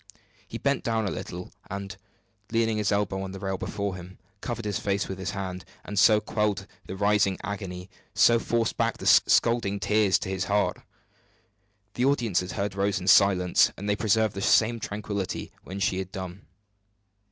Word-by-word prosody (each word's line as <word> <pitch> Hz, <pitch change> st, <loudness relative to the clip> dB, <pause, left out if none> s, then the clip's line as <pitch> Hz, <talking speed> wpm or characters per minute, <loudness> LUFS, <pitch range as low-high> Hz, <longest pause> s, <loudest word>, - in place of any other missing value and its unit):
He -, -, -6 dB
bent 140 Hz, -1 st, 0 dB
down 115 Hz, -2 st, 0 dB
a -, -, -2 dB
little, 90 Hz, +1 st, -6 dB, 0.2 s
and, 100 Hz, 0 st, -5 dB, 0.6 s
leaning 115 Hz, -1 st, +1 dB
his 105 Hz, 0 st, 0 dB
elbow 100 Hz, -2 st, 0 dB
on 95 Hz, 0 st, -6 dB
the 95 Hz, -, -7 dB
rail 95 Hz, 0 st, -3 dB
before 100 Hz, -2 st, -3 dB
him, 90 Hz, +1 st, -11 dB, 0.2 s
covered 120 Hz, -2 st, -4 dB
his 105 Hz, -2 st, -1 dB
face 100 Hz, 0 st, -1 dB
with 95 Hz, 0 st, -6 dB
his 95 Hz, -1 st, -3 dB
hand; 90 Hz, -1 st, -5 dB, 0.2 s
and 105 Hz, -1 st, -2 dB
so 110 Hz, 0 st, +6 dB
quelled 105 Hz, -2 st, -1 dB, 0.2 s
the 95 Hz, -, -5 dB
rising 100 Hz, -1 st, +2 dB
agony, 95 Hz, -3 st, -5 dB, 0.3 s
so 115 Hz, 0 st, +5 dB
forced 115 Hz, -1 st, -1 dB
back -, -, 0 dB
the -, -, -8 dB
scalding 115 Hz, -4 st, +4 dB
tears 105 Hz, -1 st, +3 dB
to -, -, -6 dB
his 95 Hz, -1 st, -2 dB
heart. 105 Hz, 0 st, +1 dB, 1.2 s
The 125 Hz, -, 0 dB
audience 120 Hz, -10 st, +2 dB
had 90 Hz, 0 st, -5 dB
heard 100 Hz, -1 st, -2 dB
Rose 100 Hz, 0 st, 0 dB
in 90 Hz, -, -7 dB
silence, 90 Hz, -1 st, +5 dB
and 100 Hz, -, -6 dB
they 105 Hz, -, +2 dB
preserved 110 Hz, 0 st, +2 dB
the 100 Hz, -, -5 dB
same 115 Hz, +3 st, +3 dB
tranquillity 100 Hz, -2 st, -4 dB
when 95 Hz, +2 st, -7 dB
she 95 Hz, -2 st, 0 dB
had 95 Hz, -1 st, -5 dB
done. 95 Hz, +1 st, -7 dB
100 Hz, 180 wpm, -26 LUFS, 95-105 Hz, 1.2 s, so